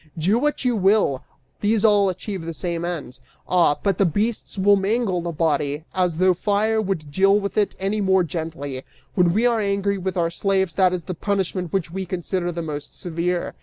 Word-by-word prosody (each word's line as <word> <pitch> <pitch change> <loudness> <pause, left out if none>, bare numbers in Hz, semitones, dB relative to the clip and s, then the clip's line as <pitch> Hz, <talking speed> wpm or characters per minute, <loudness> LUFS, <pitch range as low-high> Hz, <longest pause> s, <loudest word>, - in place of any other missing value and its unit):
Do 190 +9 +2
what 295 -1 -1
you 245 -1 +2
will, 195 -9 +2 0.4
these 215 +1 +2
all 205 -2 +5
achieve 185 +1 -5
the 165 0 -5
same 170 -1 -3
end. 165 -8 -5 0.3
Ah, 170 -5 +3
but 195 -3 +1
the 200 - +5
beasts 210 +6 -2
will 200 +1 +5
mangle 200 -2 0
the 170 0 -3
body! 150 -2 0
As 180 -3 0
though 185 +1 +4
fire 210 +4 +1
would 175 -8 -3
deal 195 +5 +4
with 200 -2 -4
it 210 -2 +1
any 200 +3 -1
more 190 -1 +3
gently; 150 -5 -5 0.3
when 180 -2 +3
we 220 +7 +2
are 235 -2 +3
angry 200 -1 0
with 190 +1 -3
our 170 -1 +1
slaves 190 -1 0
that 185 -2 +3
is 180 -2 -3
the 185 - -5
punishment 185 -1 -2
which 185 -4 -1
we 190 +1 -4
consider 175 -1 -2
the 170 0 -4
most 150 -2 -6
severe. 175 +1 -2
185 Hz, 200 wpm, -22 LUFS, 170-200 Hz, 0.4 s, all